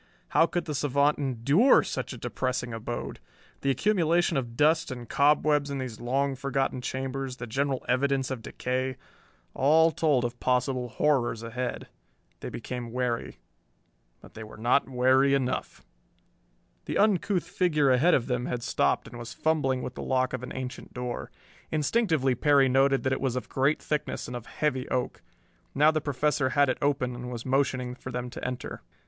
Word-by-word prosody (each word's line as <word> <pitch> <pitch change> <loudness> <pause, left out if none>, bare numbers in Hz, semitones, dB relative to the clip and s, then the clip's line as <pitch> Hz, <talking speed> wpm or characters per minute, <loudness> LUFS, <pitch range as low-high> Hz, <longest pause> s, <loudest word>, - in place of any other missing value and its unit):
How 165 - +4
could 175 0 -2
the 150 - -3
savant 145 +1 +2
endure 140 - +4
such - - -4
a - - -7
depressing 125 -2 -3
abode! 115 +1 -5 0.4
The 140 - 0
accumulation 175 - +2
of 120 -3 -3
dust 160 +2 +3
and 120 -2 -7
cobwebs 150 0 +3
in 140 - -3
these 125 -5 -5
long 135 +3 0
forgotten 135 -1 -1
chambers, 130 0 -4
the 120 - -5
general 135 +3 -1
evidence 135 +1 +1
of 130 -3 -4
decay 130 +2 -3 0.6
all 160 +4 +4
told 145 -7 +2
of 120 0 -5
possible 125 0 0
horrors 120 -5 +1
ahead. 125 +2 -4 0.5
They - - -6
became 125 -2 -6
wary. 125 -1 -2 0.8
But - - -15
they 110 - -8
were 110 - -11
not 120 +5 +2
wary 130 +2 +4
enough! 130 -2 -3 1.0
The - - -2
uncouth 200 -3 +2
figure 155 -7 +2
ahead 140 +8 +4
of 120 - 0
them 125 -1 -2
had 120 -1 -3
stopped - - +1
and 120 - -10
was 120 0 -8
fumbling 135 -5 0
with - - -5
the - - -7
lock 130 -1 0
of 130 - -3
an 125 - -7
ancient 130 -1 -7
door. 125 -1 -4 0.4
Instinctively 155 - +1
Perry 140 0 +4
noted 135 +1 +3
that 130 - +1
it - - -3
was 130 -2 0
of 125 - -4
great 140 +3 +1
thickness 150 -1 -3
and 125 - -6
of 120 -1 -7
heavy 130 -4 -2
oak. 125 -1 -2 0.5
Now 150 +3 +5
the 155 -1 -1
Professor 145 -1 0
had 145 0 +3
it 130 - -1
open 135 -3 0
and 125 0 -6
was 120 -2 -6
motioning 130 -2 0
for 130 +1 -8
them 125 0 -4
to - - -8
enter. 125 -1 -5
130 Hz, 175 wpm, -27 LUFS, 125-145 Hz, 1.0 s, Now